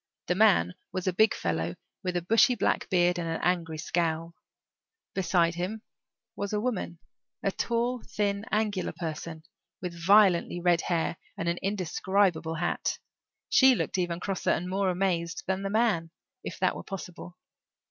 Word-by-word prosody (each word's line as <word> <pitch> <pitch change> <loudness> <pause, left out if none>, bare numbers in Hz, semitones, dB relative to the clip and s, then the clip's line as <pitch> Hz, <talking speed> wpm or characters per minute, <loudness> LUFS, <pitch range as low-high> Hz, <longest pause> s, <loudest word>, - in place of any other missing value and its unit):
The - - +1
man 185 - +4 0.2
was 185 - -3
a 185 - +1
big 220 +4 +4
fellow 85 +1 -2 0.3
with 180 -1 -1
a 175 - -2
bushy 225 +6 +4
black - - 0
beard 175 -1 +3
and 165 -1 -3
an 165 - -2
angry 170 -3 0
scowl. 165 +1 -1 0.8
Beside 170 -3 +2
him 190 +6 -4 0.5
was 200 +1 -4
a 210 - +1
woman 210 -7 -2 0.5
a 195 - +1
tall, 235 +3 -1
thin, 200 -1 -2
angular 210 -3 0
person, 160 -1 -6 0.4
with 180 -1 -5
violently 190 -3 +5
red 175 -1 +3
hair 170 -1 -1 0.2
and 170 - -3
an 170 +1 0
indescribable 190 -3 0
hat. 175 +2 -1 0.5
She 260 -1 +6
looked 195 - -2
even 175 -1 -1
crosser 195 0 -2
and 180 - +1
more 190 +1 0
amazed 175 -2 -1
than 190 0 -1
the 195 - -2
man, 205 -6 +1 0.3
if - - -6
that - - +1
were - - -6
possible. 180 -2 -8
180 Hz, 155 wpm, -28 LUFS, 170-200 Hz, 0.8 s, She